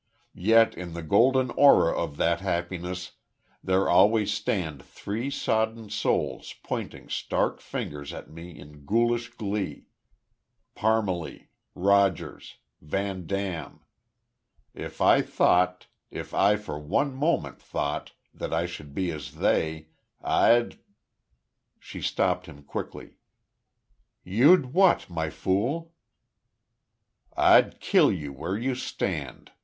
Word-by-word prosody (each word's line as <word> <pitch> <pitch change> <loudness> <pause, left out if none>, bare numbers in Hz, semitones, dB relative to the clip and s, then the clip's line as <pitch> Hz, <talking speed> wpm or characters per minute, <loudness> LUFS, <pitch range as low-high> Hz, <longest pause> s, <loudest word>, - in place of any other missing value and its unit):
"Yet 115 +4 +4
in 90 -2 -7
the 85 0 -6
golden 125 +9 +3
aura 140 -13 +5
of 70 - -3
that 85 0 +1
happiness, 90 0 -3 0.5
there 95 +1 +2
always 105 +3 +4
stand 80 -9 -2
three 115 +7 -5
sodden 110 -4 -1
souls 105 - -1
pointing - - -5
stark - - -1
fingers 75 -1 -6
at - - -9
me 85 +2 -11
in 75 0 -14
ghoulish 120 +2 +1
glee.... 105 -4 -4 0.9
Parmalee 105 -8 -1 0.3
Rogers 100 -1 +1 0.3
VanDam.... 95 +1 -4 0.9
If - - -8
I - - +6
thought 90 +1 +2 0.2
if - - -8
I 100 +2 +4
for 105 -8 -6
one 135 - 0
moment 150 +6 -1
thought - - -4 0.2
that - - -6
I 80 +1 0
should 75 -5 -9
be 95 -2 -1
as 75 -2 -8
they, 80 0 0 0.3
I'd 120 0 +2 0.5
" 60 -1 -49
She - - -9
stopped - - 0
him, 70 0 -13
quickly: - - -7 1.1
"You'd 130 - +4
what, 185 - +3
My 80 -2 -2
Fool?" 120 - -1 1.4
"I'd - - +5
kill - - +4
you 75 -6 -5
where 80 +8 -3
you 130 +4 -1
stand!" 80 - -4
95 Hz, 115 wpm, -26 LUFS, 80-115 Hz, 1.4 s, I